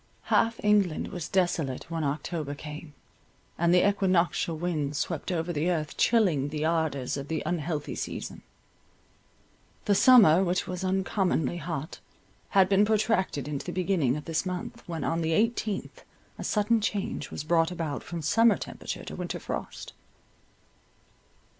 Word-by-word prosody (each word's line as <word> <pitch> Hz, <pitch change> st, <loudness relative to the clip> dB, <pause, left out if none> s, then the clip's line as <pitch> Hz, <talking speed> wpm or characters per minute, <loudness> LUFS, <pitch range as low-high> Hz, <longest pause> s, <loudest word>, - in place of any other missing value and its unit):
Half 230 Hz, 0 st, +3 dB
England 205 Hz, -6 st, +2 dB
was 175 Hz, -5 st, -5 dB
desolate, 170 Hz, -8 st, 0 dB
when 165 Hz, -1 st, -2 dB
October 150 Hz, +1 st, -3 dB
came, 150 Hz, 0 st, -9 dB, 0.6 s
and 170 Hz, 0 st, +2 dB
the 180 Hz, +2 st, +5 dB
equinoctial 185 Hz, -4 st, +1 dB
winds 155 Hz, -4 st, -2 dB
swept 170 Hz, +1 st, -2 dB
over 175 Hz, 0 st, -1 dB
the 155 Hz, +3 st, 0 dB
earth, 155 Hz, -4 st, -2 dB
chilling 185 Hz, -, +3 dB
the 150 Hz, +1 st, -3 dB
ardours 160 Hz, -6 st, 0 dB
of 140 Hz, 0 st, -6 dB
the 160 Hz, 0 st, -2 dB
unhealthy 155 Hz, -2 st, -2 dB
season. -, -, -5 dB, 1.4 s
The 205 Hz, -, +3 dB
summer, 195 Hz, -6 st, +7 dB
which 180 Hz, 0 st, 0 dB
was 180 Hz, 0 st, -5 dB
uncommonly 185 Hz, -4 st, 0 dB
hot, 160 Hz, -1 st, -5 dB, 0.5 s
had 190 Hz, -2 st, +5 dB
been 195 Hz, +1 st, +4 dB
protracted 210 Hz, -, +1 dB
into 145 Hz, -2 st, -4 dB
the -, -, -2 dB
beginning 170 Hz, -8 st, +1 dB
of 150 Hz, -, -8 dB
this 165 Hz, -1 st, -1 dB
month, 180 Hz, -2 st, -5 dB
when 165 Hz, -4 st, -4 dB
on 165 Hz, +4 st, 0 dB
the 160 Hz, 0 st, 0 dB
eighteenth 220 Hz, -, -1 dB, 0.4 s
a -, -, -4 dB
sudden 215 Hz, +2 st, +2 dB
change 200 Hz, -8 st, -2 dB
was -, -, -5 dB
brought 165 Hz, +1 st, +2 dB
about 165 Hz, -6 st, -4 dB
from 170 Hz, -2 st, -6 dB
summer 225 Hz, +8 st, +4 dB
temperature -, -, -6 dB
to -, -, -7 dB
winter -, -, -4 dB
frost. -, -, -6 dB
170 Hz, 145 wpm, -28 LUFS, 155-195 Hz, 1.4 s, summer